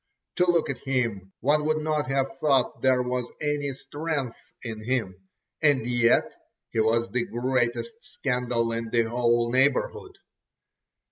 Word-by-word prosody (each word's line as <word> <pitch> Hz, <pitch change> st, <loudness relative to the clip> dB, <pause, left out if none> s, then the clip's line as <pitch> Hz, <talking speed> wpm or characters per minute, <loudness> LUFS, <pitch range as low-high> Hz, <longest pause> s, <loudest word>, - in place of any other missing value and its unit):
To 180 Hz, -1 st, +3 dB
look 170 Hz, -2 st, +3 dB
at 130 Hz, -, -7 dB
him—one 125 Hz, +2 st, 0 dB
would 155 Hz, 0 st, +2 dB
not 155 Hz, -1 st, -1 dB
have 135 Hz, 0 st, 0 dB
thought 135 Hz, -4 st, +2 dB
there 130 Hz, -1 st, +3 dB
was 125 Hz, -1 st, -2 dB
any 145 Hz, -1 st, -1 dB
strength 145 Hz, -3 st, -5 dB
in 110 Hz, -3 st, -6 dB
him, 100 Hz, -6 st, -3 dB, 0.3 s
and 145 Hz, -6 st, +3 dB
yet 120 Hz, -1 st, +4 dB, 0.5 s
he -, -, -1 dB
was 115 Hz, +1 st, +2 dB
the 120 Hz, 0 st, 0 dB
greatest 120 Hz, -, -1 dB
scandal 125 Hz, -, -1 dB
in 115 Hz, 0 st, -3 dB
the 115 Hz, 0 st, +3 dB
whole 120 Hz, 0 st, +1 dB
neighbourhood. 135 Hz, +2 st, +1 dB
125 Hz, 135 wpm, -26 LUFS, 115-145 Hz, 0.5 s, yet